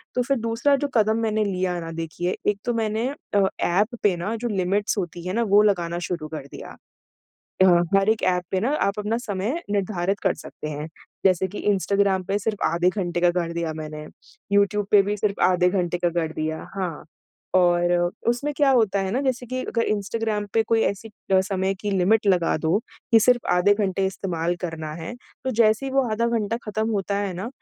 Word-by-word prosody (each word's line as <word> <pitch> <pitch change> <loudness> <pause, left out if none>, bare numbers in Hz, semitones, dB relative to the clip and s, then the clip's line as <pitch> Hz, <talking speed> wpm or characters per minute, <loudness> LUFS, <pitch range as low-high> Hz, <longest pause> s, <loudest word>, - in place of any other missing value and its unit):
तो 250 - +2
फिर 275 +2 0
दूसरा 230 +5 +2
जो - - +1
कदम 220 0 +3
मैंने 215 -1 +1
लिया 185 -2 -1
ना, 165 -1 -6
देखिए 165 +2 -3
एक 205 -1 +1
तो 240 - 0
मैंने 225 +1 -1 0.3
अ, 200 - +5 0.2
ऐप 210 +7 +1
पे 200 -3 +4
ना 205 +7 -3
जो - - +1
लिमिट्स 200 +2 0
होती 175 -2 -4
हैं 185 - -2
ना, 235 - +2
वो 205 -1 +5
लगाना 175 -4 +1
शुरू 165 -4 -4
कर 140 -2 -7
दिया। - - -9 0.9
अ, 190 - +7 0.3
हर 195 +1 +2
एक 220 - 0
ऐप 180 - -2
पे 190 - 0
ना 250 +7 0 0.2
आप 200 - -3
अपना 210 +2 -1
समय 205 - -1
निर्धारित 195 -1 -1
कर 190 - +2
सकते 150 - -7
हैं। 150 +2 -5 0.4
जैसे 190 0 +3
कि 205 - -8
इंस्टाग्राम 195 -1 +1
पे 200 +2 0
सिर्फ़ 210 0 -2
आधे 175 +2 +2
घंटे 175 -3 -2
का 175 - +4
कर 170 -1 -3
दिया 170 -1 -2
मैंने। 155 0 -7 0.5
यूट्यूब 200 0 +2
पे 205 -1 +7
भी 205 +1 -2
सिर्फ़ 205 -1 -1
आधे 180 0 +3
घंटे 175 -2 -1
का 175 0 +1
कर 165 -2 -2
दिया 155 0 -3
हाँ। 180 -6 -4 0.5
और 175 -1 +4 0.4
उसमें 265 +5 0
क्या 285 -2 +4
होता 220 -6 +3
है 190 -1 -2
ना 250 +7 0
जैसे 255 -2 -1
कि 255 +2 -3
अगर 230 - -1
इंस्टाग्राम 210 0 -1
पे 225 - +4
कोई 225 +1 +1
ऐसी 200 +3 -2 0.2
अ, 190 - +6
समय 190 -1 -1
की 205 +2 -4
लिमिट 200 +3 +2
लगा 180 -4 +3
दो 160 +5 +1 0.3
कि 225 - +7
सिर्फ़ 245 +2 +3
आधे 180 +3 +4
घंटे 195 -2 0
इस्तेमाल 175 -3 -2
करना 160 -3 -4
है। 165 +6 -6 0.3
तो 260 - 0
जैसे 225 +2 +3
ही 265 - -4
वो 270 0 +3
आधा 230 +2 +1
घंटा 215 +2 -2
खत्म 215 +1 -2
होता 200 -1 -1
है 200 -2 -2
ना, 190 +6 -4
200 Hz, 210 wpm, -24 LUFS, 175-220 Hz, 0.9 s, अ